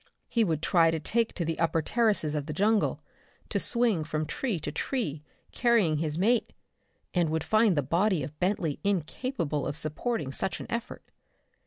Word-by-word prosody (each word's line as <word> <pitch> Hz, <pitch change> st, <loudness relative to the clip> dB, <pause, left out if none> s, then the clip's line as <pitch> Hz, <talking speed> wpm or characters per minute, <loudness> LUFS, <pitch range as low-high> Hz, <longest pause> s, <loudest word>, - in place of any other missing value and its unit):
He 230 Hz, -, +2 dB
would 160 Hz, -5 st, -1 dB
try 165 Hz, -2 st, +4 dB
to 160 Hz, 0 st, -1 dB
take 230 Hz, +8 st, 0 dB
to 170 Hz, -, -1 dB
the 165 Hz, 0 st, -2 dB
upper 165 Hz, -1 st, +1 dB
terraces 210 Hz, -8 st, +1 dB
of 150 Hz, -1 st, -3 dB
the 155 Hz, -, -3 dB
jungle, 210 Hz, +6 st, +1 dB, 0.5 s
to -, -, 0 dB
swing 235 Hz, -, +2 dB
from 155 Hz, 0 st, -2 dB
tree 215 Hz, -, -2 dB
to 145 Hz, -, -4 dB
tree, 160 Hz, -, -2 dB, 0.3 s
carrying 225 Hz, -10 st, +3 dB
his 155 Hz, 0 st, -1 dB
mate 225 Hz, +6 st, +2 dB, 0.6 s
and 175 Hz, -3 st, +2 dB
would 160 Hz, 0 st, -1 dB
find 215 Hz, -5 st, +3 dB
the 145 Hz, -, +2 dB
body 170 Hz, +3 st, +1 dB
of 150 Hz, +3 st, -8 dB
Bentley 180 Hz, -5 st, 0 dB
incapable 175 Hz, -, -1 dB
of 145 Hz, +1 st, -3 dB
supporting 155 Hz, -, -2 dB
such 185 Hz, -, -2 dB
an -, -, -6 dB
effort. 235 Hz, -1 st, -4 dB
170 Hz, 175 wpm, -28 LUFS, 155-220 Hz, 0.6 s, try